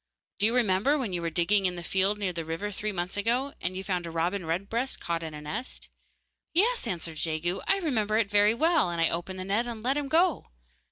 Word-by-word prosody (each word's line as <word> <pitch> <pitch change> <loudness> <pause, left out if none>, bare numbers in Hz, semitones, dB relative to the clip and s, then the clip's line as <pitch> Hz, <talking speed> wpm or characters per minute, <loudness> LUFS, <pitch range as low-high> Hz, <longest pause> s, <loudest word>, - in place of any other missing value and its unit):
'Do 205 - +5
you 230 - +1
remember 235 +5 +3
when 235 -9 -3
you 175 - -1
were 170 - -1
digging 185 +4 +2
in 180 - -3
the 175 - -6
field 195 +4 +1
near 195 -3 -2
the 165 -1 -3
river, 165 +6 -3
three 210 +2 -3
months 180 0 -4
ago, 245 +7 0
you 185 +1 -2
found 180 -3 -2
a - - -4
robin 170 +2 -1
redbreast 200 +10 -1
caught 170 -1 -2
in 160 -2 -6
a 150 - -7
net? 150 +12 -5 0.6
'Yes,' 460 +8 +3
answered 165 -3 -4
Jegu, 165 +3 -1
'I 390 - +4
remember 220 - 0
it 220 -2 +2
very 205 +2 +4
well, 320 - +3
and 170 -1 -3
I 165 - +4
opened 175 +3 -3
the 185 - -5
net 210 +5 0
and 225 -2 -6
let 265 +3 +1
him 290 -1 -1
go. 330 +2 +2
200 Hz, 230 wpm, -28 LUFS, 175-235 Hz, 0.6 s, Do